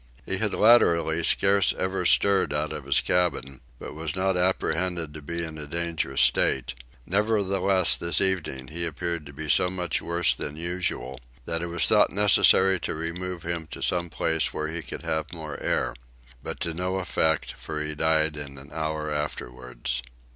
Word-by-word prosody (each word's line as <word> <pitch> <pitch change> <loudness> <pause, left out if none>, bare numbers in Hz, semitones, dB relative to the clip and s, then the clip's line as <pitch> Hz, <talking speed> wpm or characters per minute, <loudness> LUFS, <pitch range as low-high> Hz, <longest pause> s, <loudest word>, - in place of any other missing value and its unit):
He 95 - -2
had 110 -1 0
latterly 85 -8 +4
scarce 100 +2 +3
ever 95 -1 0
stirred 100 -5 +3
out 75 +1 -2
of 75 -3 -7
his 70 - +3
cabin 70 -7 -1 0.2
but - - -8
was 80 +1 -3
not 95 0 +1
apprehended 90 -2 -1
to 75 - -9
be 85 +4 -4
in 80 -2 -7
a 75 - -7
dangerous 80 -5 -1
state; - - +2 0.3
nevertheless 100 -2 +2
this 85 -3 +2
evening 85 -9 -1
he 85 +3 -3
appeared 85 -1 -3
to - - -10
be 75 +2 -7
so 90 +4 +3
much 90 -1 -2
worse 85 0 +1
than 75 - -6
usual 85 -6 -3 0.3
that 80 0 -2
it 85 - -3
was 85 0 +2
thought - - +5
necessary 95 -2 +5
to - - -4
remove 85 +2 -5
him 85 -1 -4
to - - -7
some 85 -1 0
place 80 0 0
where 75 0 -3
he 80 +1 -4
could - - -8
have 80 0 -2
more 80 -3 -7
air; - - 0 0.5
but - - -6
to 85 - -2
no 90 +3 -2
effect 80 -4 0
for 75 - -6
he 75 0 -3
died 80 0 +1
in 70 -2 -7
an 70 +1 -12
hour 80 -1 -3
afterwards. 60 -4 -4
85 Hz, 175 wpm, -26 LUFS, 75-90 Hz, 0.5 s, thought